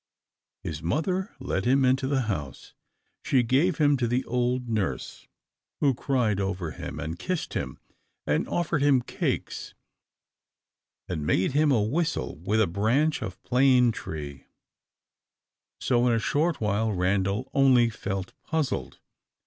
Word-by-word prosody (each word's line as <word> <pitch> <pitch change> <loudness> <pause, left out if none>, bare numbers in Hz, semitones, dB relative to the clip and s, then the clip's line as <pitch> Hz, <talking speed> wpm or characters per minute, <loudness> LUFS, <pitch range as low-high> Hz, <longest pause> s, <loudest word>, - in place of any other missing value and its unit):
His 75 -1 -5
mother 180 - -1
led 95 - -2
him 135 +2 +4
into 130 +1 +2
the 135 -1 +1
house. 75 - -5 0.5
She 130 -3 +3
gave 145 +9 +2
him 145 -2 +4
to 120 -2 0
the 125 +3 0
old 125 0 0
nurse, 110 -5 -3 0.5
who 140 -2 +3
cried 120 -6 0
over 95 -4 -2
him, - - -7
and 80 +2 -5
kissed 180 - -3
him, 65 - -3 0.5
and - - 0
offered 170 -4 0
him 140 -3 +4
cakes, - - -3 1.3
and 80 -5 -3
made 90 - +1
him 150 +2 +3
a 115 -6 +3
whistle 145 - -1
with 100 +7 0
a - - +5
branch 115 - +1
of 95 - -6
plane 125 -1 +4
tree, 75 -8 -7 1.3
So 120 0 +2
in 120 - +3
a - - +3
short 150 +8 0
while 110 +1 0
Randal 100 +5 0
only 125 -4 +5
felt 95 -3 -4
puzzled. 160 -3 -2
120 Hz, 140 wpm, -27 LUFS, 95-140 Hz, 1.3 s, a